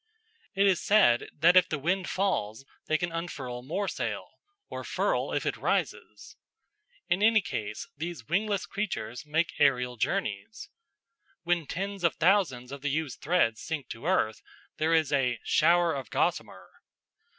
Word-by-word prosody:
It 195 +1 +3
is 190 -3 +3
said 195 - +4
that 170 +4 +4
if 185 -1 +6
the 155 - -1
wind 175 +6 -1
falls 135 - -1 0.2
they 155 - +2
can 175 +1 -3
unfurl 140 -8 -5
more 180 +10 -3
sail, - - -4 0.4
or - - -6
furl - - -1
if - - -1
it - - -1
rises. - - -3 0.7
In 175 +3 +1
any 220 +1 +5
case, 105 - -5
these 170 +2 -6
wingless 200 +3 0
creatures 150 - -4
make 160 +1 0
aerial 125 -2 +2
journeys. 110 - -3 0.7
When 170 -3 0
tens 195 +1 -4
of 170 - +2
thousands 165 -9 +2
of 140 -1 -7
the 145 - -1
used 145 -1 -3
threads 140 -9 +1
sink 155 -5 -5
to 115 +8 -6
earth, 110 - +1 0.4
there 160 +1 +2
is 155 -3 +1
a 125 -4 +1
"shower 170 +1 +3
of 135 -2 -5
gossamer." - - -2
165 Hz, 150 wpm, -28 LUFS, 130-185 Hz, 0.7 s, if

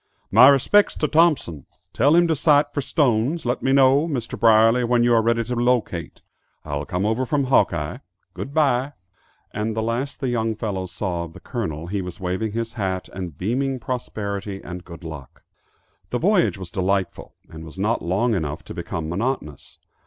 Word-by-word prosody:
"My 120 +6 +8
respects 140 +9 +4
to 150 - 0
Thompson. 150 - +2 0.3
Tell 145 +7 +4
him 175 0 +5
to 160 - +1
sight 145 0 +3
for 145 - -1
Stone's. 135 +2 0
Let 120 +1 -1
me 135 - +1
know, 135 +3 +4
Mr. 130 -8 -3
Brierly, 115 +1 +4
when 120 0 +2
you 120 0 +3
are 115 - +5
ready 115 +1 +1
to 125 +2 -4
locate; 120 -9 -1 0.4
I'll 75 -1 -3
come 90 +7 -2
over 110 +4 0
from 140 +2 0
Hawkeye. 85 - +1 0.3
Goodbye." 140 -1 0 0.6
And 110 +1 -2
the 110 - -1
last 120 +5 -3
the 135 - -2
young 115 -2 -1
fellows 95 -4 -4
saw 90 -4 -3
of 80 - -12
the - - -12
Colonel, 85 - -4
he 100 +3 -3
was 90 +2 -8
waving 95 +4 -2
his 115 0 -3
hat, 95 -4 -3
and 90 -6 -6
beaming 130 +7 -1
prosperity 100 -5 -4
and 90 0 -7
good 85 -1 -12
luck. 75 -5 -10 0.7
The 125 - -1
voyage 180 - +2
was 95 -3 -8
delightful, 95 -1 -2
and 80 0 -10
was 80 +2 -11
not 105 +4 0
long 100 +8 0
enough 80 -6 -3
to - - -9
become 80 -1 -5
monotonous. 85 - -4
115 Hz, 180 wpm, -22 LUFS, 95-130 Hz, 0.7 s, My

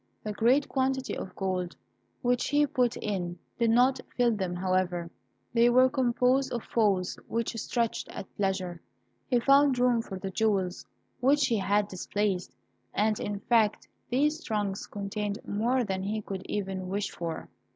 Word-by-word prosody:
The 215 - -3
great 245 +7 +3
quantity 265 -1 0
of 190 - -7
coin 185 -2 -1 0.5
which 245 0 +2
he 290 +1 +3
put 250 -4 +1
in 180 -4 -3 0.2
did 235 -1 +3
not 250 +3 +4 0.2
fill 245 -1 +4
them, 185 -3 -2
however. 180 -2 0 0.4
They 235 0 +5
were 255 +1 +6
composed 255 0 +2
of 235 - -3
folds 195 -5 +1
which 230 0 -2
stretched 235 -1 -1
at 195 - -9
pleasure. 190 -3 -1 0.5
He 245 - +3
found 275 +1 +5
room 245 -2 +3
for 195 -4 -7
the 190 0 -5
jewels 195 -4 0 0.3
which 280 +2 +4
he 230 - +1
had 200 +1 +2
displaced, 195 -1 -2 0.4
and, 215 0 +2
in 205 -1 -3
fact, 220 -2 +2 0.2
these 300 +6 +1
trunks 205 -3 -2
contained 205 0 -3
more 240 +5 +1
than 190 -3 -2
he 210 +2 -2
could 195 -1 -6
even 190 -2 -3
wish 200 +1 -2
for. 165 -2 -5
215 Hz, 155 wpm, -29 LUFS, 190-245 Hz, 0.5 s, were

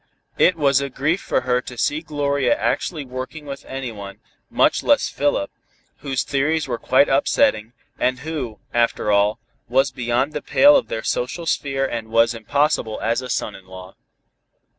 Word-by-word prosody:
It 185 - +5
was 140 -3 +2
a 140 - -3
grief 155 +8 -1
for - - 0
her 125 0 +1
to 125 -1 -10
see 145 +6 0
Gloria 140 -5 0
actually 155 -6 -2
working 130 +4 -7
with 140 -1 -7
anyone, 115 -7 -7 0.3
much - - +2
less - - +3
Philip, 145 -9 -1 0.5
whose 135 -2 -2
theories 150 +3 0
were 120 -2 -3
quite 135 +2 +3
upsetting, 115 -4 +2 0.3
and 130 0 0
who, 140 -8 -5 0.2
after 115 -3 +1
all, 105 +2 +3 0.3
was 135 +2 +2
beyond 125 +3 -1
the 150 - -3
pale 290 +1 +5
of 275 - +2
their 110 - -4
social 125 +8 -2
sphere 135 -4 -1
and 115 -4 -4
was 115 +1 +3
impossible 115 0 0
as 115 +3 0
a 130 - -8
son 105 - -2
in 95 -1 -14
law. 95 0 -11
130 Hz, 165 wpm, -21 LUFS, 115-145 Hz, 0.5 s, It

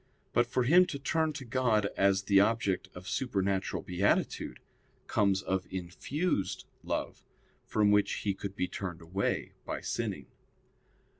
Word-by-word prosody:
But 120 0 +3
for 125 +1 +1
him 175 +8 +6
to 140 - -4
turn 160 +3 +1
to 140 -2 -7
God 115 -4 +2
as 95 0 +3
the 100 0 +5
object 100 -2 +1
of 90 +2 -9
supernatural 100 -4 -1
beatitude, 90 +3 0 0.5
comes 100 -1 +2
of 95 -1 -1
infused 95 - -2 0.2
love, - - -3 0.4
from 105 -1 +3
which 105 0 +4
he 100 - +2
could 100 0 -6
be 90 - 0
turned 90 -4 -5
away 95 +4 -2
by - - -4
sinning. - - -3
100 Hz, 140 wpm, -31 LUFS, 95-120 Hz, 0.5 s, him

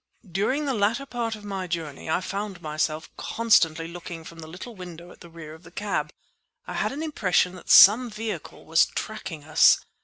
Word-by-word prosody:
During 260 - 0
the 275 - 0
latter 225 +5 0
part 235 -4 -3
of 210 -1 -13
my 195 -2 -4
journey 160 -4 -5
I 160 - +1
found 200 0 -5
myself 155 0 -2
constantly 165 -8 +2
looking 170 -1 -8
from 165 +1 -12
the 160 - -9
little 185 +9 -9
window 175 -2 -10
at - - -17
the 170 - -12
rear 160 -2 -10
of 160 - -14
the 170 - -14
cab. 205 +3 -3 0.5
I - - -6
had - - -1
an 290 +4 -5
impression 185 - +1
that 185 - -12
some 235 +5 +8
vehicle 215 -5 -6
was 165 +1 +4
tracking 195 -8 -6
us. 155 +1 +5
180 Hz, 190 wpm, -25 LUFS, 165-215 Hz, 0.5 s, some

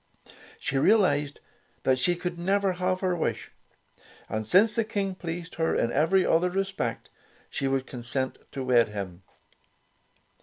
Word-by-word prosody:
She 135 - -1
realized 145 -7 +3 0.4
that 130 -1 +2
she 175 +7 +2
could 175 0 -4
never 195 +2 +1
have 185 0 -1
her 185 -2 +1
wish, 160 - -2 0.8
and 110 +1 -2
since 200 - +5
the 230 - +1
King 200 -3 -2
pleased 170 -1 -6
her 160 - +2
in 115 - +1
every 180 +8 +3
other 175 +2 +3
respect, 190 -10 -3 0.4
she 135 - -1
would 135 -1 0
consent 130 +1 -3
to 135 - -3
wed 120 -2 +4
him. 95 -4 -6
165 Hz, 145 wpm, -27 LUFS, 130-185 Hz, 0.8 s, since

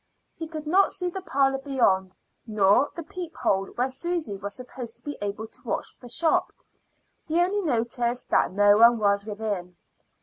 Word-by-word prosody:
He 325 - -6
could 310 -1 -7
not 375 +6 +4
see 360 -1 -3
the 385 - -5
parlor 270 -5 +1
beyond, 195 -10 +1 0.3
nor 210 +4 +3
the 335 - -5
peep 345 +1 -7
hole 195 0 0
where 250 +2 +1
Susy 320 - -2
was 200 +1 -6
supposed 250 -2 -8
to - - -13
be 290 - -5
able 205 +2 -3
to 220 - -10
watch - - -4
the 245 - -11
shop; 320 +6 +1 0.7
he 325 +2 0
only 380 +4 +2
noticed 240 - -1
that - - +3
no 205 +1 +5
one 235 +1 +7
was 200 -1 +1
within. 205 -5 -4
240 Hz, 175 wpm, -26 LUFS, 205-315 Hz, 0.7 s, one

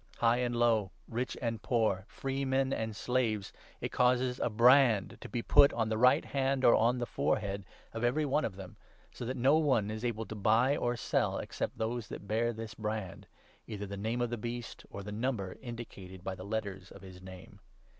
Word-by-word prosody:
High 115 0 +3
16 125 - +1
and 120 - -3
low, 115 -5 +2 0.2
rich 120 +3 -3
and 115 -2 -2
poor, 110 -6 +1
freemen 135 0 -1
and 110 -1 -3
slaves 115 -4 -1
— - - -27
it - - -3
causes 125 0 +2
a - - +1
brand 120 -2 +4
to - - -8
be 120 -2 -3
put 140 - +6
on 115 -2 0
the 110 - 0
right 125 +2 +5
hand 135 -1 0
or 120 - +8
on 120 +3 +3
the 120 - -1
forehead 100 -3 -1 0.3
of 115 - -4
every 130 +6 +2
one 145 +2 +1
of 100 - -3
them, 95 -2 -10 0.3
so 120 - -7
that 130 +3 -3
no 135 +6 +4
one 125 -9 +2
is 110 +1 -5
able 115 -2 -2
to - - -7
buy 115 +7 +3
or 120 -3 -1
sell, - - 0
except - - -4
those 115 0 -2
that - - -7
17 100 - -14
bear 115 +3 +1
this 115 0 -7
brand 105 -3 -5 0.2
— - - -32
either 105 -2 -5
the 100 0 -6
name 110 +4 -2
of 120 -1 -1
the 120 - -3
Beast 120 +1 -6
or 100 - -7
the 105 - -7
number 105 -4 -2
indicated 100 -7 -8
by 95 - -3
the 95 0 -9
letters 100 -3 -4
of 100 - -13
his 95 -1 -11
name. 95 -1 -12
115 Hz, 215 wpm, -32 LUFS, 105-125 Hz, 0.3 s, or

